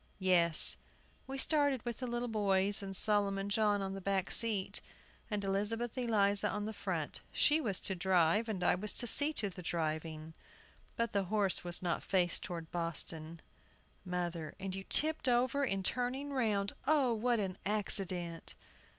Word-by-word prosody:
Yes; 175 Hz, -4 st, +6 dB, 0.5 s
we 270 Hz, +1 st, -5 dB
started 285 Hz, -4 st, +1 dB
with 235 Hz, -2 st, -5 dB
the 255 Hz, -, -4 dB
little 240 Hz, 0 st, -3 dB
boys 200 Hz, -2 st, +2 dB
and 195 Hz, -1 st, -6 dB
Solomon 200 Hz, -1 st, +3 dB
John 205 Hz, -1 st, +1 dB
on 195 Hz, 0 st, -4 dB
the 195 Hz, -, -7 dB
back 195 Hz, 0 st, -1 dB
seat, 215 Hz, -5 st, +2 dB, 0.5 s
and 210 Hz, -2 st, -2 dB
Elizabeth 210 Hz, +4 st, -2 dB
Eliza 205 Hz, -5 st, +2 dB
on 210 Hz, -, -3 dB
the 220 Hz, -, -5 dB
front. -, -, -4 dB
She 300 Hz, +2 st, +2 dB
was 200 Hz, -9 st, -1 dB
to 190 Hz, -, -1 dB
drive, 185 Hz, +3 st, +1 dB
and 190 Hz, -4 st, -3 dB
I -, -, +3 dB
was 205 Hz, +4 st, -3 dB
to -, -, -3 dB
see 290 Hz, +5 st, +5 dB
to 215 Hz, -, -2 dB
the 180 Hz, -, -10 dB
driving. 160 Hz, -1 st, -4 dB, 0.6 s
But 230 Hz, -1 st, -2 dB
the 200 Hz, -1 st, 0 dB
horse 200 Hz, -1 st, 0 dB
was 175 Hz, +1 st, -1 dB
not 175 Hz, -1 st, -1 dB
faced 180 Hz, -3 st, +1 dB
toward 165 Hz, -3 st, -7 dB
Boston. 165 Hz, -1 st, -4 dB, 0.6 s
MOTHER. 175 Hz, -4 st, -4 dB
And 190 Hz, -1 st, -5 dB
you 195 Hz, 0 st, -6 dB
tipped 310 Hz, -3 st, +1 dB
over 255 Hz, +3 st, +1 dB
in 195 Hz, -7 st, -1 dB
turning 255 Hz, +6 st, -2 dB
round! 210 Hz, -6 st, 0 dB
Oh, 280 Hz, -5 st, +3 dB
what 235 Hz, +1 st, 0 dB
an 190 Hz, -2 st, -4 dB
accident! 185 Hz, -5 st, -1 dB
200 Hz, 165 wpm, -33 LUFS, 180-230 Hz, 0.6 s, Yes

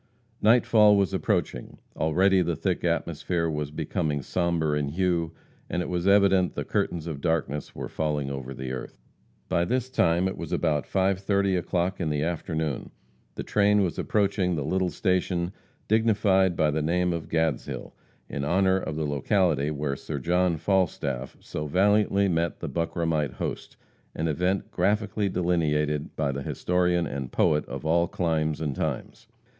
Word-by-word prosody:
Nightfall 110 Hz, -2 st, +5 dB
was 100 Hz, -4 st, +1 dB
approaching. 60 Hz, -, -1 dB, 0.2 s
Already 95 Hz, +4 st, +3 dB
the 85 Hz, -1 st, 0 dB
thick -, -, -2 dB
atmosphere 85 Hz, -2 st, -1 dB
was 75 Hz, -2 st, -2 dB
becoming 75 Hz, -1 st, -2 dB
sombre 85 Hz, -3 st, 0 dB
in 75 Hz, -1 st, -1 dB
hue, 85 Hz, 0 st, 0 dB, 0.4 s
and 90 Hz, -, -1 dB
it -, -, -6 dB
was 90 Hz, +1 st, -1 dB
evident 100 Hz, -2 st, +4 dB
the -, -, -3 dB
curtains 85 Hz, -3 st, -1 dB
of 75 Hz, -4 st, -5 dB
darkness 75 Hz, -4 st, -1 dB
were -, -, -5 dB
falling 75 Hz, -3 st, -2 dB
over 65 Hz, -1 st, -5 dB
the 65 Hz, -1 st, -5 dB
earth. 65 Hz, -, -6 dB, 0.5 s
By 85 Hz, -, +1 dB
this 125 Hz, +6 st, -1 dB
time 85 Hz, -6 st, +2 dB
it 95 Hz, -, -3 dB
was -, -, -6 dB
about 75 Hz, -2 st, 0 dB
5:30 95 Hz, 0 st, +1 dB
o'clock 90 Hz, +1 st, -1 dB
in 80 Hz, -, 0 dB
the 75 Hz, -1 st, 0 dB
afternoon. 80 Hz, -3 st, -2 dB, 0.5 s
The -, -, -4 dB
train 105 Hz, 0 st, +3 dB
was 90 Hz, -, -2 dB
approaching 100 Hz, -4 st, +1 dB
the 75 Hz, -3 st, -2 dB
little 95 Hz, +3 st, 0 dB
station 90 Hz, -2 st, 0 dB, 0.4 s
dignified 100 Hz, -4 st, +3 dB
by 75 Hz, -2 st, +2 dB
the 80 Hz, +1 st, -1 dB
name 90 Hz, +3 st, +1 dB
of 85 Hz, -2 st, -5 dB
Gadshill, 80 Hz, -5 st, -2 dB, 0.3 s
in 70 Hz, -, -4 dB
honor 95 Hz, +5 st, +3 dB
of 80 Hz, -5 st, -4 dB
the 80 Hz, 0 st, -1 dB
locality 75 Hz, 0 st, +1 dB
where 75 Hz, -2 st, -2 dB
Sir 75 Hz, +2 st, -5 dB
John 90 Hz, +4 st, +1 dB
Falstaff 80 Hz, -8 st, -1 dB
so 75 Hz, 0 st, -5 dB
valiantly 100 Hz, +3 st, +3 dB
met 85 Hz, -2 st, -1 dB
the -, -, -4 dB
Buckramite 80 Hz, -3 st, -1 dB
host, -, -, -5 dB, 0.4 s
an 80 Hz, -, -1 dB
event 90 Hz, +5 st, -1 dB
graphically 105 Hz, 0 st, 0 dB
delineated 75 Hz, -4 st, 0 dB
by 70 Hz, -3 st, 0 dB
the 70 Hz, +1 st, -4 dB
historian 90 Hz, +3 st, 0 dB
and 70 Hz, -3 st, -5 dB
poet 75 Hz, 0 st, +2 dB
of -, -, -6 dB
all 85 Hz, +2 st, +3 dB
climes 80 Hz, -4 st, -1 dB
and 75 Hz, -4 st, -2 dB
times. -, -, -4 dB
85 Hz, 160 wpm, -26 LUFS, 75-95 Hz, 0.5 s, Nightfall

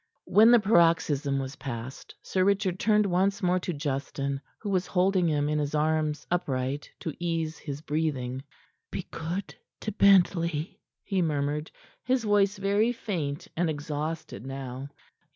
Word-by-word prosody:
When 220 Hz, +3 st, +6 dB
the 240 Hz, 0 st, +8 dB
paroxysm 165 Hz, -8 st, +3 dB
was 135 Hz, 0 st, -4 dB
past, 130 Hz, -1 st, -7 dB
Sir 185 Hz, -, +1 dB
Richard 195 Hz, -2 st, +1 dB
turned 210 Hz, -1 st, +3 dB
once 195 Hz, +2 st, +1 dB
more 180 Hz, 0 st, +3 dB
to 180 Hz, -, -3 dB
Justin, 140 Hz, -2 st, -3 dB, 0.2 s
who 205 Hz, -, -4 dB
was 185 Hz, -1 st, +1 dB
holding 185 Hz, -1 st, +2 dB
him 145 Hz, -1 st, +1 dB
in 150 Hz, 0 st, 0 dB
his 145 Hz, 0 st, -1 dB
arms, 155 Hz, 0 st, 0 dB
upright, 140 Hz, -4 st, -1 dB
to 160 Hz, -, -3 dB
ease 165 Hz, -3 st, -2 dB
his 145 Hz, -1 st, -6 dB
breathing. 145 Hz, -5 st, -2 dB, 0.5 s
"Be -, -, -5 dB
good 175 Hz, +5 st, -4 dB, 0.3 s
to 215 Hz, -, -3 dB
Bentley," 175 Hz, -5 st, +3 dB, 0.2 s
he 195 Hz, -3 st, 0 dB
murmured, 150 Hz, -1 st, -1 dB, 0.3 s
his 255 Hz, -1 st, +1 dB
voice 205 Hz, -1 st, +3 dB
very 200 Hz, +4 st, +2 dB
faint 170 Hz, -11 st, -3 dB
and 175 Hz, 0 st, +1 dB
exhausted 150 Hz, -, -4 dB
now. 135 Hz, 0 st, -6 dB
160 Hz, 145 wpm, -28 LUFS, 145-190 Hz, 0.5 s, the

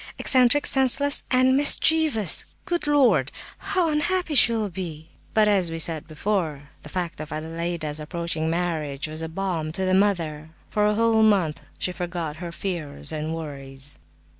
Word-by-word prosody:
Eccentric, 255 Hz, +2 st, +4 dB
senseless 270 Hz, +2 st, +4 dB
and 255 Hz, 0 st, +3 dB
mischievous! 290 Hz, -, +4 dB, 0.2 s
Good 345 Hz, -5 st, -2 dB
Lord, 290 Hz, -3 st, +3 dB, 0.3 s
how 355 Hz, -4 st, 0 dB
unhappy 330 Hz, +2 st, 0 dB
she 250 Hz, -4 st, +6 dB
will 215 Hz, -4 st, -2 dB
be!" 165 Hz, -4 st, -7 dB, 0.3 s
But 215 Hz, -1 st, +4 dB
as 195 Hz, -4 st, +2 dB
we 165 Hz, -, -5 dB
said 160 Hz, -1 st, -1 dB
before, 155 Hz, -4 st, -3 dB
the 150 Hz, -, -12 dB
fact 180 Hz, +1 st, -4 dB
of 155 Hz, -1 st, -7 dB
Adelaida's 160 Hz, -1 st, -4 dB
approaching 160 Hz, 0 st, -3 dB
marriage 160 Hz, -5 st, -2 dB
was 155 Hz, +1 st, -5 dB
balm 165 Hz, -2 st, -3 dB
to 190 Hz, +2 st, -1 dB
the 185 Hz, -, +1 dB
mother. 165 Hz, -6 st, 0 dB, 0.2 s
For 210 Hz, -1 st, +1 dB
a 210 Hz, -, +1 dB
whole 225 Hz, 0 st, +2 dB
month 195 Hz, -8 st, +2 dB, 0.2 s
she 180 Hz, -, -2 dB
forgot 175 Hz, -4 st, -5 dB
her 170 Hz, 0 st, -7 dB
fears 160 Hz, -6 st, -4 dB
and 155 Hz, +1 st, -4 dB
worries. 140 Hz, -3 st, -7 dB
175 Hz, 155 wpm, -24 LUFS, 155-225 Hz, 0.3 s, she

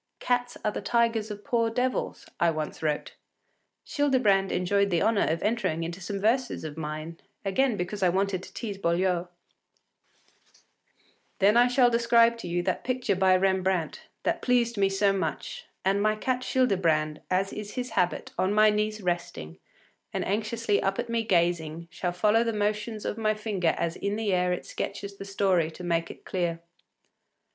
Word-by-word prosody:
“Cats 245 Hz, 0 st, -1 dB
are 210 Hz, -, +2 dB
the -, -, -5 dB
tigers 230 Hz, 0 st, +1 dB
of 205 Hz, 0 st, -7 dB
poor 235 Hz, -4 st, +1 dB
devils,” 250 Hz, +3 st, -2 dB
I 170 Hz, -, +4 dB
once 155 Hz, -1 st, -4 dB
wrote. 150 Hz, -2 st, -2 dB, 0.7 s
Childebrand 250 Hz, -, +2 dB
enjoyed 200 Hz, +2 st, +1 dB
the 170 Hz, -3 st, +1 dB
honour 220 Hz, -2 st, +2 dB
of 165 Hz, +1 st, -1 dB
entering 195 Hz, -7 st, 0 dB
into 170 Hz, +3 st, -5 dB
some 200 Hz, +2 st, -4 dB
verses 240 Hz, +3 st, 0 dB
of 155 Hz, -2 st, -6 dB
mine, 155 Hz, +1 st, -6 dB, 0.3 s
again 220 Hz, +4 st, +1 dB
because 180 Hz, +3 st, -4 dB
I 185 Hz, -, +4 dB
wanted 190 Hz, +1 st, 0 dB
to -, -, -12 dB
tease 205 Hz, -4 st, -5 dB
Boileau: 180 Hz, 0 st, +1 dB, 2.1 s
“Then 225 Hz, +5 st, +5 dB
shall 250 Hz, 0 st, +4 dB
I -, -, -7 dB
describe 235 Hz, 0 st, +4 dB
to 180 Hz, -, -6 dB
you 175 Hz, 0 st, -1 dB
that -, -, -1 dB
picture 255 Hz, -5 st, 0 dB
by 185 Hz, 0 st, +4 dB
Rembrandt, 190 Hz, -3 st, 0 dB, 0.2 s
that -, -, 0 dB
pleased 240 Hz, -2 st, +2 dB
me 195 Hz, -1 st, +2 dB
so 195 Hz, +1 st, +2 dB
much; 195 Hz, -, -4 dB, 0.2 s
and 195 Hz, +1 st, +2 dB
my 215 Hz, +1 st, +2 dB
cat 255 Hz, +3 st, -1 dB
Childebrand, 170 Hz, -13 st, +1 dB
as 190 Hz, +1 st, 0 dB
is 210 Hz, -1 st, -6 dB
his 250 Hz, -2 st, -3 dB
habit, 180 Hz, -4 st, 0 dB
on 185 Hz, +1 st, +2 dB
my 215 Hz, 0 st, +6 dB
knees 215 Hz, 0 st, -1 dB
resting, 170 Hz, -, -3 dB, 0.5 s
and -, -, -2 dB
anxiously 215 Hz, +1 st, 0 dB
up 195 Hz, 0 st, 0 dB
at 240 Hz, 0 st, -3 dB
me 230 Hz, -1 st, 0 dB
gazing, 170 Hz, -3 st, 0 dB
shall 180 Hz, 0 st, -2 dB
follow 210 Hz, +6 st, +3 dB
the 230 Hz, -1 st, -1 dB
motions 210 Hz, +1 st, -2 dB
of 220 Hz, -, -3 dB
my 215 Hz, -1 st, +1 dB
finger 205 Hz, -6 st, 0 dB
as 170 Hz, 0 st, -2 dB
in 200 Hz, +1 st, -2 dB
the 215 Hz, -3 st, -1 dB
air 180 Hz, 0 st, +2 dB
it 180 Hz, -, -3 dB
sketches 200 Hz, 0 st, -5 dB
the 195 Hz, -, -7 dB
story 190 Hz, -4 st, +1 dB
to 165 Hz, -, -11 dB
make 170 Hz, -1 st, 0 dB
it -, -, -12 dB
clear. 170 Hz, -3 st, -1 dB
200 Hz, 175 wpm, -27 LUFS, 175-225 Hz, 2.1 s, my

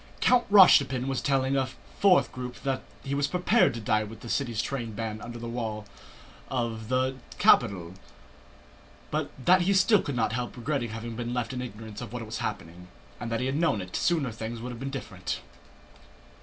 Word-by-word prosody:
Count 250 Hz, -1 st, +3 dB
Rostopchín 140 Hz, -10 st, +7 dB
was 135 Hz, -2 st, -1 dB
telling 135 Hz, -1 st, +1 dB
a 135 Hz, -1 st, +1 dB, 0.3 s
fourth 190 Hz, -3 st, +5 dB
group 125 Hz, -1 st, -6 dB
that 135 Hz, -1 st, -1 dB, 0.2 s
he 135 Hz, -, -3 dB
was 140 Hz, 0 st, +1 dB
prepared 180 Hz, 0 st, +3 dB
to -, -, -4 dB
die 110 Hz, 0 st, +1 dB
with 110 Hz, +1 st, -10 dB
the 120 Hz, -, -8 dB
city 120 Hz, -3 st, -1 dB
train 115 Hz, 0 st, -2 dB
bands 110 Hz, 0 st, -4 dB
under 120 Hz, 0 st, -7 dB
the 120 Hz, 0 st, -6 dB
walls 110 Hz, -3 st, -4 dB, 0.6 s
of 115 Hz, -4 st, -2 dB
the 130 Hz, +1 st, +1 dB, 0.2 s
capital, 90 Hz, -7 st, +4 dB, 1.2 s
but -, -, -1 dB, 0.2 s
that 185 Hz, 0 st, +6 dB
he 195 Hz, +3 st, +2 dB
still 195 Hz, +2 st, +5 dB
could 140 Hz, -, -4 dB
not 110 Hz, -2 st, 0 dB
help 125 Hz, +1 st, -3 dB
regretting 125 Hz, -1 st, -2 dB
having 115 Hz, +1 st, -6 dB
been 120 Hz, +1 st, -3 dB
left 125 Hz, +1 st, -2 dB
in 125 Hz, -, -3 dB
ignorance 110 Hz, -3 st, -8 dB
of -, -, -7 dB
what 120 Hz, -2 st, -4 dB
was 110 Hz, +1 st, -5 dB
happening, 85 Hz, +2 st, -5 dB, 0.3 s
and 115 Hz, 0 st, -5 dB
that 115 Hz, -, 0 dB
had 130 Hz, +1 st, 0 dB
he 145 Hz, -, 0 dB
known 165 Hz, -11 st, +2 dB
it 90 Hz, -1 st, -7 dB
sooner 155 Hz, -8 st, +1 dB
things 115 Hz, +1 st, -6 dB
would 125 Hz, +2 st, -5 dB
have 120 Hz, -, -8 dB
been 135 Hz, +1 st, -4 dB
different.... 135 Hz, -, -5 dB
125 Hz, 195 wpm, -28 LUFS, 110-135 Hz, 1.2 s, Rostopchín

